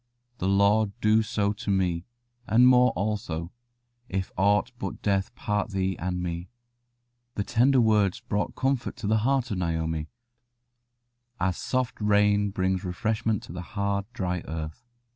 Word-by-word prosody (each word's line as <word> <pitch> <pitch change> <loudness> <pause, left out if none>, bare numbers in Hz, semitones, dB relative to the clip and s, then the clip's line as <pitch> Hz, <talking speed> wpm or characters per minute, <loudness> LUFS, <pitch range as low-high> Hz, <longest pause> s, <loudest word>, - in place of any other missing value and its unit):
The 95 - -1
Lord 100 +1 +3
do 110 0 +4
so 105 -2 0
to 100 - -6
me, 90 -3 +1 0.4
and 120 +3 +6
more 125 0 +6
also, 90 -4 -3 0.6
if 95 0 -2
aught 105 +4 +2
but 95 - -5
death 100 -2 0
part 105 +1 -1
thee 95 -2 -1
and 90 0 -2
me." 85 0 -4 0.9
The 100 - -1
tender 130 +6 +3
words 105 -3 +3
brought 105 -3 -2
comfort 135 -1 -1
to 105 - -7
the 110 +2 +3
heart 130 +1 +1
of 95 - -1
Naomi, 80 -2 -2 1.3
as 95 0 0
soft 130 -3 -2
rain 105 0 +3
brings 95 -1 -1
refreshment 110 +3 -1
to - - -10
the 90 - -5 0.2
hard, 100 0 0
dry 90 -6 -2
earth. 80 +6 -5
100 Hz, 145 wpm, -27 LUFS, 95-110 Hz, 1.3 s, and